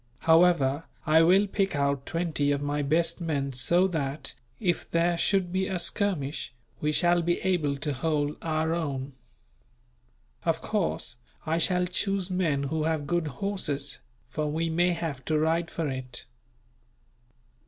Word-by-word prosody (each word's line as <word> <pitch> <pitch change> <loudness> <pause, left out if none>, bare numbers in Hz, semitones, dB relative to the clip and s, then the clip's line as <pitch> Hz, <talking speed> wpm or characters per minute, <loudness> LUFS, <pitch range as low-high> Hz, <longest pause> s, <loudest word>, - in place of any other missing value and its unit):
However, 160 -3 +4 0.2
I 160 0 +5
will 185 +5 +5
pick 195 -3 -1
out 140 -1 0
twenty 165 -4 0
of 140 - +1
my 145 +1 -1
best 165 +4 +1
men 140 -5 -1
so 170 +10 +3
that, 150 -3 -3 0.3
if 175 -6 -1
there 170 +1 +2
should 185 +1 +1
be 190 0 +1
a 190 - -2
skirmish, 170 - 0 0.3
we 150 - 0
shall 175 +2 +3
be 175 +1 0
able 155 -7 +1
to 145 +1 -2
hold 145 +2 -1
our 160 0 0
own. 140 -5 -3 1.3
Of 165 -1 +1
course, 165 - -2 0.3
I 160 +1 +1
shall 180 +1 +2
choose 190 +1 -1
men 165 -7 +1
who 155 +2 -1
have 160 -2 0
good 170 +1 0
horses, 145 -3 -2 0.3
for 150 +5 -2
we 165 +2 -1
may 175 +2 +2
have 160 -6 -4
to 155 - +1
ride 165 +2 +1
for 165 -2 -2
it." 130 -2 -6
160 Hz, 150 wpm, -27 LUFS, 145-175 Hz, 1.3 s, I